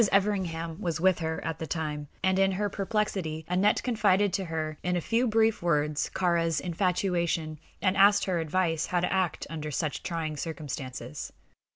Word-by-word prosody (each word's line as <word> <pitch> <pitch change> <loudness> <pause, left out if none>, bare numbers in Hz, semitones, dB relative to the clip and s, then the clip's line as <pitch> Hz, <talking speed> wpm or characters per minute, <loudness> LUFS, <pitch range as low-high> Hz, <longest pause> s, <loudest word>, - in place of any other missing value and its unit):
Everingham 185 -4 0
was 170 -4 -1
with 185 +1 +3
her 160 -1 -3
at 165 -1 -3
the 160 - -4
time, 150 -3 -3 0.2
and 190 0 +3
in 195 0 +3
her 205 +2 0
perplexity 195 -6 -2
Aneth 185 +4 +2
confided 205 -5 +2
to 190 +1 0
her 155 -2 -3
in 180 0 0
a - - +2
few 230 +8 +1
brief 220 0 +2
words 150 -3 +1
Kāra's 170 -3 +2
infatuation, 170 -3 0 0.2
and 185 -1 +3
asked 200 +1 +5
her 180 -3 0
advice 165 0 0
how 175 -1 +1
to 180 - 0
act 185 -4 0
under 155 -1 -5
such 150 0 -2
trying 160 -3 -3
circumstances. 140 - -5
175 Hz, 170 wpm, -28 LUFS, 160-195 Hz, 0.2 s, asked